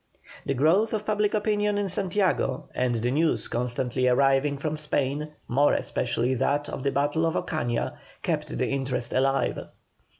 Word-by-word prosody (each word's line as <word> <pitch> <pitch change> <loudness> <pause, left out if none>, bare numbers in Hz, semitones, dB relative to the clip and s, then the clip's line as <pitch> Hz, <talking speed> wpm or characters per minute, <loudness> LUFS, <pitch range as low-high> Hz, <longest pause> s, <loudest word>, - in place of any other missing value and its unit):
The 135 - 0
growth 175 - +3
of 210 0 -4
public 210 0 +1
opinion 210 -1 +1
in 205 -1 0
Santiago, 185 -8 0
and 125 -1 0
the 120 +2 0
news 160 +4 +1
constantly 125 +1 -1
arriving 135 +2 +3
from 155 +2 -2
Spain, 150 0 -2
more 140 +4 +3
especially 120 +1 0
that 140 +3 0
of - - -5
the 140 +1 0
battle 145 +4 +1
of 165 -1 +1
Ocaña, 120 -1 -1 0.3
kept - - -2
the - - 0
interest 135 -3 -2
alive. 135 +1 +1
140 Hz, 155 wpm, -26 LUFS, 130-170 Hz, 0.3 s, growth